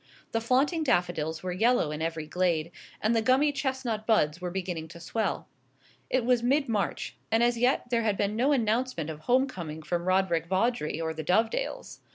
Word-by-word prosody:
The 225 Hz, -, 0 dB
flaunting 270 Hz, +8 st, +2 dB
daffodils 175 Hz, -, 0 dB
were 185 Hz, -, -2 dB
yellow 220 Hz, -3 st, +2 dB
in 150 Hz, +1 st, -4 dB
every 165 Hz, -1 st, -2 dB
glade, 170 Hz, -1 st, 0 dB, 0.3 s
and 220 Hz, +2 st, +3 dB
the 225 Hz, -, +3 dB
gummy 260 Hz, +6 st, +3 dB
chestnut 260 Hz, -6 st, -2 dB
buds 180 Hz, -7 st, +2 dB
were 180 Hz, -, -2 dB
beginning 175 Hz, -3 st, -4 dB
to 170 Hz, +1 st, -12 dB
swell. 205 Hz, +3 st, -2 dB, 0.6 s
It 255 Hz, -2 st, +1 dB
was 245 Hz, -1 st, +3 dB
mid 275 Hz, +4 st, +2 dB
March, 215 Hz, -4 st, -2 dB
and 225 Hz, +1 st, +3 dB
as 240 Hz, 0 st, +3 dB
yet 245 Hz, +1 st, +1 dB
there 235 Hz, -1 st, +2 dB
had 210 Hz, -3 st, 0 dB
been 205 Hz, +1 st, 0 dB
no 255 Hz, +6 st, +2 dB
announcement 225 Hz, -, 0 dB
of 150 Hz, -, -9 dB
home 250 Hz, +11 st, +3 dB
coming 160 Hz, -, -7 dB
from 170 Hz, +2 st, -2 dB
Roderick 185 Hz, -3 st, +2 dB
Vawdrey 190 Hz, -4 st, 0 dB
or 160 Hz, -1 st, -2 dB
the 160 Hz, 0 st, -5 dB
Dovedales. 225 Hz, -, -1 dB
210 Hz, 190 wpm, -28 LUFS, 170-245 Hz, 0.6 s, and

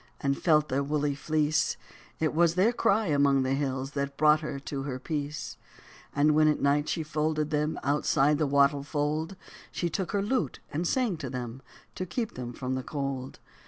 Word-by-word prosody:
And 140 Hz, -1 st, +1 dB
felt 150 Hz, -2 st, +3 dB
their 135 Hz, +2 st, +1 dB
woolly 145 Hz, 0 st, 0 dB
fleece; 155 Hz, +2 st, 0 dB, 0.4 s
It 155 Hz, -1 st, +1 dB
was 170 Hz, +1 st, +3 dB
their 205 Hz, +6 st, +3 dB
cry 220 Hz, -2 st, +2 dB
among 140 Hz, -4 st, +3 dB
the 130 Hz, +1 st, 0 dB
hills 135 Hz, -1 st, -2 dB
That 140 Hz, -1 st, -3 dB
brought 150 Hz, 0 st, +5 dB
her 155 Hz, -3 st, -4 dB
to 140 Hz, 0 st, -5 dB
her 135 Hz, -2 st, -4 dB
peace. 145 Hz, +1 st, -4 dB, 0.6 s
69 -, -, -3 dB
And 150 Hz, +1 st, +5 dB
when 155 Hz, 0 st, +5 dB
at 150 Hz, -, +2 dB
night 145 Hz, +1 st, +2 dB
she 160 Hz, -, -1 dB
folded 155 Hz, 0 st, -1 dB
them, 150 Hz, +1 st, 0 dB
Outside 145 Hz, 0 st, +2 dB
the 155 Hz, -, +2 dB
wattle 140 Hz, 0 st, +3 dB
fold 150 Hz, +4 st, -2 dB, 0.4 s
She 170 Hz, -2 st, -2 dB
took 175 Hz, +3 st, -2 dB
her 200 Hz, -1 st, +1 dB
lute 250 Hz, +5 st, -1 dB, 0.2 s
and 170 Hz, +4 st, 0 dB
sang 240 Hz, -7 st, +1 dB
to 140 Hz, -4 st, -5 dB
them 125 Hz, 0 st, -5 dB, 0.3 s
To 185 Hz, -, -4 dB
keep 225 Hz, +5 st, -3 dB
them 125 Hz, -1 st, -6 dB
from 130 Hz, +1 st, -4 dB
the 130 Hz, -, -1 dB
cold. 135 Hz, -2 st, -4 dB
150 Hz, 195 wpm, -28 LUFS, 140-155 Hz, 0.6 s, brought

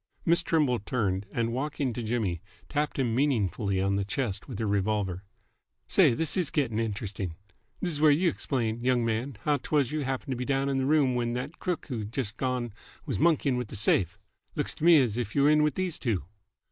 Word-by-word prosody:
Miss 170 Hz, +1 st, +4 dB
Trimble 150 Hz, -8 st, +2 dB
turned, 100 Hz, -3 st, -1 dB
and, 115 Hz, -1 st, -1 dB
walking 140 Hz, -1 st, -2 dB
to 120 Hz, -, -4 dB
Jimmy, 110 Hz, -7 st, -1 dB, 0.3 s
tapped 150 Hz, 0 st, -1 dB
him 125 Hz, -4 st, +1 dB
meaningly 110 Hz, -7 st, +1 dB
on 100 Hz, +1 st, +1 dB
the 100 Hz, -, 0 dB
chest 100 Hz, -1 st, -3 dB
with 125 Hz, -7 st, -6 dB
her 110 Hz, -, -1 dB
revolver. 100 Hz, -2 st, -1 dB, 0.6 s
"Say, -, -, +4 dB
this 160 Hz, +2 st, -1 dB
is 180 Hz, -5 st, +1 dB
gett'n 130 Hz, -9 st, 0 dB
interesting! 100 Hz, -5 st, -3 dB, 0.5 s
This 180 Hz, -, -1 dB
is 150 Hz, -2 st, -2 dB
where 155 Hz, -, +7 dB
y' 170 Hz, +6 st, +3 dB
'xplain, 120 Hz, -6 st, -2 dB
y'ng 125 Hz, -2 st, +2 dB
man, 115 Hz, +4 st, -2 dB
how 150 Hz, -1 st, +2 dB
'twas 140 Hz, -1 st, 0 dB
you 155 Hz, -, -1 dB
happened 135 Hz, 0 st, -3 dB
to 130 Hz, -, -1 dB
be 125 Hz, -, -2 dB
down 135 Hz, +1 st, 0 dB
in 135 Hz, -1 st, 0 dB
this 130 Hz, -, 0 dB
room 145 Hz, -4 st, +3 dB
when 120 Hz, -1 st, -1 dB
th't 140 Hz, +6 st, -5 dB
crook 180 Hz, -2 st, -2 dB
who's 110 Hz, -5 st, -3 dB
just 110 Hz, -2 st, -3 dB
gone 125 Hz, -4 st, -2 dB, 0.3 s
was -, -, -2 dB
monkeyin' 150 Hz, -5 st, +3 dB
with 125 Hz, -2 st, -3 dB
the -, -, -8 dB
safe. 100 Hz, -2 st, +1 dB, 0.4 s
L'ks -, -, -1 dB
t' -, -, -10 dB
me 170 Hz, -1 st, +8 dB
as 120 Hz, -5 st, +1 dB
if 115 Hz, -3 st, -3 dB
you 140 Hz, -, +4 dB
were 145 Hz, -, +6 dB
in 150 Hz, 0 st, +5 dB
with 150 Hz, -1 st, +2 dB
these 185 Hz, -3 st, -1 dB
two." 110 Hz, -, -1 dB
125 Hz, 215 wpm, -28 LUFS, 110-145 Hz, 0.6 s, me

